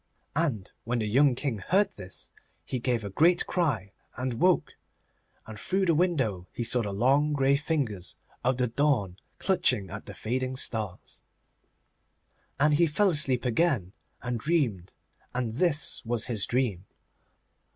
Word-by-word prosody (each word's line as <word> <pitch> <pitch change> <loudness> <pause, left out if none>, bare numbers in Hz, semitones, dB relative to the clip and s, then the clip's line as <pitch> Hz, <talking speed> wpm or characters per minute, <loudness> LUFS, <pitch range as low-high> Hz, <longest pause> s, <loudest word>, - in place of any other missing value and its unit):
And 140 - -1
when 120 +2 -1
the 110 - -1
young 130 +5 +4
King 125 -5 -2
heard 190 - +2
this 95 -2 -9 0.3
he 130 - -3
gave 120 -2 0
a 100 - -5
great 170 - +3
cry, 125 - -1 0.3
and 130 0 -2
woke, 185 -1 +3 0.7
and 110 -1 -9
through 190 - 0
the 170 - +3
window 130 - 0
he 120 - -3
saw 120 +1 +1
the 105 -3 -3
long 135 +9 +2
grey 140 -1 +3
fingers 140 - -2 0.3
of 125 +1 +1
the 125 - +2
dawn 120 -7 +1 0.2
clutching 130 - +1
at 105 +1 -7
the 100 - -8
fading 130 +5 -2
stars. 110 -8 -3 1.4
And 150 +1 +4
he 170 +3 +4
fell 190 +6 +2
asleep 135 -5 +1
again, 125 - +1 0.3
and 125 -1 -2
dreamed, 115 - 0 0.4
and 120 -3 -1
this 150 0 +1
was 120 -2 -1
his 110 -5 -1
dream. 110 -7 -1
125 Hz, 150 wpm, -28 LUFS, 105-150 Hz, 1.4 s, young